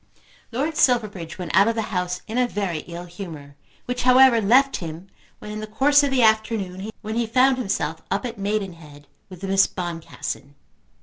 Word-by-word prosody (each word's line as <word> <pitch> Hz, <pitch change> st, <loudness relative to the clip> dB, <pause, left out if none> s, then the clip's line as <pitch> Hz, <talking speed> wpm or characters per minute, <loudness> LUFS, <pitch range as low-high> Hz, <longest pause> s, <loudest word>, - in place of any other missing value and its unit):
Lord 290 Hz, +6 st, -2 dB
Silverbridge 205 Hz, -10 st, +1 dB
went 180 Hz, -2 st, -4 dB
out 195 Hz, +3 st, +6 dB
of 230 Hz, -, +1 dB
the 225 Hz, -, -1 dB
house 180 Hz, 0 st, -2 dB
in 225 Hz, +3 st, -2 dB
a 250 Hz, -, +3 dB
very 195 Hz, -8 st, -2 dB
ill 175 Hz, 0 st, -7 dB
humour, 165 Hz, -6 st, -9 dB, 0.3 s
which 250 Hz, 0 st, -3 dB
however 255 Hz, -1 st, +6 dB
left 260 Hz, +7 st, +4 dB
him 170 Hz, +2 st, -8 dB, 0.3 s
when 210 Hz, -, -9 dB
in 215 Hz, -, -5 dB
the 215 Hz, -, -6 dB
course 280 Hz, +7 st, +4 dB
of 285 Hz, -, +1 dB
the 260 Hz, -3 st, +2 dB
afternoon 220 Hz, -3 st, +1 dB
he 220 Hz, +2 st, -1 dB
found 255 Hz, +3 st, +3 dB
himself 195 Hz, -8 st, -2 dB
up 200 Hz, +5 st, -1 dB
at 230 Hz, -4 st, -6 dB
Maidenhead 175 Hz, -8 st, -4 dB, 0.2 s
with 185 Hz, 0 st, -12 dB
Miss 195 Hz, 0 st, +3 dB
Boncassen. 165 Hz, -5 st, -6 dB
205 Hz, 175 wpm, -23 LUFS, 180-240 Hz, 0.3 s, out